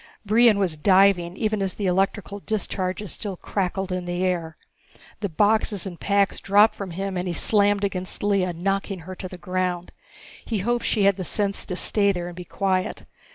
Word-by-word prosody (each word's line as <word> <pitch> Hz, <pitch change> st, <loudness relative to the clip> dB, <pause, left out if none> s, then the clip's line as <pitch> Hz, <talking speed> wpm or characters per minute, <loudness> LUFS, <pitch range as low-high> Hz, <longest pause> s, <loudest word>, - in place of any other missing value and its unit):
Brion 220 Hz, +1 st, +5 dB
was 180 Hz, -6 st, 0 dB
diving 185 Hz, 0 st, +4 dB
even 215 Hz, -2 st, 0 dB
as 195 Hz, -1 st, -1 dB
the 205 Hz, -, -3 dB
electrical 195 Hz, +2 st, 0 dB
discharges 195 Hz, -2 st, -3 dB
still 200 Hz, -4 st, -5 dB
crackled 190 Hz, 0 st, -2 dB
in 180 Hz, -1 st, -2 dB
the 175 Hz, +1 st, -1 dB
air. 170 Hz, -3 st, -2 dB, 0.6 s
The 200 Hz, -, -2 dB
boxes 205 Hz, +2 st, +1 dB
and 180 Hz, -3 st, -7 dB
packs 200 Hz, 0 st, +1 dB
dropped 205 Hz, +3 st, +4 dB
from 200 Hz, -2 st, -6 dB
him 190 Hz, +2 st, -4 dB
and 180 Hz, +1 st, -2 dB
he 175 Hz, -, -2 dB
slammed 205 Hz, 0 st, +2 dB
against 185 Hz, -1 st, -3 dB
Lea, 195 Hz, -3 st, +2 dB
knocking 195 Hz, +2 st, -2 dB
her 185 Hz, +3 st, -8 dB
to 185 Hz, 0 st, -7 dB
the 185 Hz, -, -9 dB
ground. 180 Hz, 0 st, -2 dB, 0.5 s
He 225 Hz, -, -2 dB
hoped 240 Hz, 0 st, 0 dB
she 210 Hz, -, +1 dB
had 200 Hz, -1 st, +4 dB
the 185 Hz, -, -3 dB
sense 200 Hz, +2 st, -1 dB
to 180 Hz, -, -3 dB
stay 200 Hz, +2 st, +3 dB
there 175 Hz, -2 st, -4 dB
and 175 Hz, 0 st, -7 dB
be 180 Hz, 0 st, -8 dB
quiet. 185 Hz, 0 st, -1 dB
195 Hz, 190 wpm, -24 LUFS, 180-205 Hz, 0.6 s, Brion